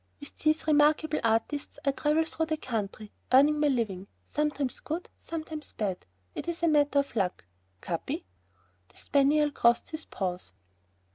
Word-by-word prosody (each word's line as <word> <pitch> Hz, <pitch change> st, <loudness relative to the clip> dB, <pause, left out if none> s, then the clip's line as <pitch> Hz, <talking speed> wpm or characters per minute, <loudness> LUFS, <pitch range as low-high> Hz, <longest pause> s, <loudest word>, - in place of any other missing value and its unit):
With 285 Hz, -, -11 dB
these 310 Hz, 0 st, +2 dB
remarkable 305 Hz, +1 st, +3 dB
artistes 230 Hz, +6 st, 0 dB
I 275 Hz, -, +4 dB
travel 300 Hz, +3 st, +1 dB
through 320 Hz, 0 st, -2 dB
the 315 Hz, 0 st, -1 dB
country, 215 Hz, -5 st, -4 dB, 0.2 s
earning 290 Hz, +3 st, +6 dB
my 300 Hz, -, +3 dB
living, 215 Hz, -8 st, -1 dB, 0.2 s
sometimes 295 Hz, -3 st, -1 dB
good, 330 Hz, +4 st, -4 dB
sometimes 315 Hz, -2 st, -6 dB
bad,... 190 Hz, -, -3 dB, 0.3 s
it -, -, -6 dB
is 340 Hz, 0 st, -3 dB
a -, -, +5 dB
matter 290 Hz, -2 st, +3 dB
of 280 Hz, -2 st, +1 dB
luck! 185 Hz, -, -1 dB, 0.4 s
Capi!..." -, -, -3 dB, 0.6 s
The -, -, -21 dB
spaniel 295 Hz, +1 st, +3 dB
crossed 235 Hz, 0 st, +2 dB
his 315 Hz, 0 st, -6 dB
paws. 180 Hz, -, -4 dB
290 Hz, 150 wpm, -29 LUFS, 230-310 Hz, 0.6 s, earning